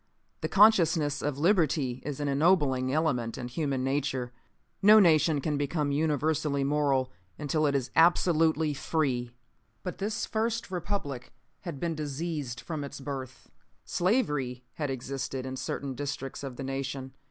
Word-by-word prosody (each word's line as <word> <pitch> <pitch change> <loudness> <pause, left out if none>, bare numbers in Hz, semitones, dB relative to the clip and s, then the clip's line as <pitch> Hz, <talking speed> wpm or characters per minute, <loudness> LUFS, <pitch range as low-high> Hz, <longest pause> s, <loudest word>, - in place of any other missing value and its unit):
The - - -1
consciousness 165 -8 +4
of 145 -2 -2
liberty 150 - +2
is 145 -1 -5
an 145 - -1
ennobling 140 -4 +2
element 135 -7 0
in 125 - -5
human 135 -1 -1
nature. 135 -2 -1 0.5
No 215 +2 +8
nation 155 -5 +4
can 150 0 -1
become 145 0 0
universally 150 -1 +1
moral 135 -2 +1 0.3
until 155 +1 0
it 140 - +1
is 130 -2 -1
absolutely 160 -2 +4
FREE. 135 -4 -1 0.5
"But 180 - -5
this 210 +2 -2
first 225 -1 -2
Republic 175 -9 -4 0.3
had 170 -7 -7
been 170 +1 -1
diseased 150 -3 -4
from 155 -4 -4
its 140 0 -7
birth. 135 -3 -7 0.3
Slavery 150 - 0
had 145 -3 -3
existed 135 0 -4
in 130 0 -4
certain 135 +1 -4
districts 135 0 -5
of 135 -3 -6
the 135 - -6
nation. 135 0 -4
145 Hz, 140 wpm, -29 LUFS, 135-160 Hz, 0.5 s, No